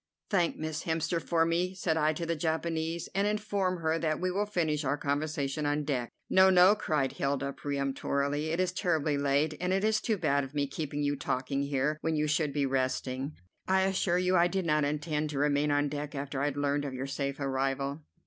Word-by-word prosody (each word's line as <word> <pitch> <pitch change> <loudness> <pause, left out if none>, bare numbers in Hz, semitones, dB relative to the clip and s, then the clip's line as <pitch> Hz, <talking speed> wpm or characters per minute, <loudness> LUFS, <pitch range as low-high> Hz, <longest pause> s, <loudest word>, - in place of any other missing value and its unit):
"Thank 175 -5 +2
Miss 155 0 -4
Hemster 165 +1 0
for 165 -1 +2
me," 175 +3 0
said 175 -3 0
I 155 -1 +3
to 170 +2 -4
the 165 0 -1
Japanese, 160 +1 -2
"and 200 +1 +1
inform 205 -4 -1
her 160 +1 +1
that 155 -2 0
we 185 0 0
will 205 +3 0
finish 160 -7 0
our 145 +1 0
conversation 145 0 -1
on 145 +1 0
deck." 130 -5 -2 0.2
"No, 190 0 +6
no!" 185 +1 +7
cried 150 -9 0
Hilda 140 0 -1
peremptorily; 140 +1 -1
"it 165 +2 -1
is 185 -1 +1
terribly 160 -5 0
late, 140 +2 +1
and 180 0 0
it 195 +1 +1
is 220 0 +2
too 220 -3 0
bad 140 -5 +1
of 135 +2 -9
me 145 -1 +1
keeping 145 +1 -4
you 145 0 +1
talking 135 +1 -2
here 140 +2 0
when 160 0 0
you 150 0 +1
should 150 -1 +1
be 145 -1 0
resting. 130 +1 -1 0.3
I 190 0 +3
assure 190 -2 +1
you 180 +1 +2
I 175 0 +5
did 190 0 -2
not 150 -2 +2
intend 150 +1 -1
to 145 - -4
remain 145 +1 +2
on 145 0 +2
deck 145 +1 -5
after 140 -1 -3
I - - +2
had 145 -1 -2
learned 145 0 0
of 135 -2 -4
your 130 +1 -3
safe 140 0 -3
arrival." 135 +1 -1
150 Hz, 215 wpm, -30 LUFS, 140-170 Hz, 0.3 s, no